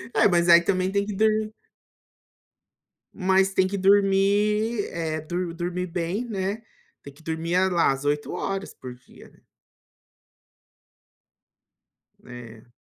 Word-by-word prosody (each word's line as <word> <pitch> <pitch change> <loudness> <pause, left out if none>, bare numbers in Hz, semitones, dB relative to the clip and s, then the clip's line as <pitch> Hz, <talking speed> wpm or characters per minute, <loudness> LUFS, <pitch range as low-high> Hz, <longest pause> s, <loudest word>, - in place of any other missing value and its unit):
É, - - +5
mas 175 -2 +2
aí 170 0 +7
também 185 +1 0
tem 200 0 0
que 205 -2 -5
dormir 215 0 +1 1.6
mas 190 0 +1
tem 190 0 +2
que 200 +1 -4
dormir, 205 +3 +2
eh, 160 -2 -3
dor 175 +2 -4
dormir 180 +1 -4
bem, 175 +6 -3
né, 205 0 -3 0.4
tem 140 - -11
que 160 +3 -21
dormir 165 +2 -2
lá 170 -5 +3
às 135 +1 -5
8 145 0 -1
horas 195 0 -4
por 125 -1 -10
dia, 125 - -18
né. - - -26 2.9
É. 120 -1 -12
185 Hz, 125 wpm, -24 LUFS, 165-200 Hz, 2.9 s, aí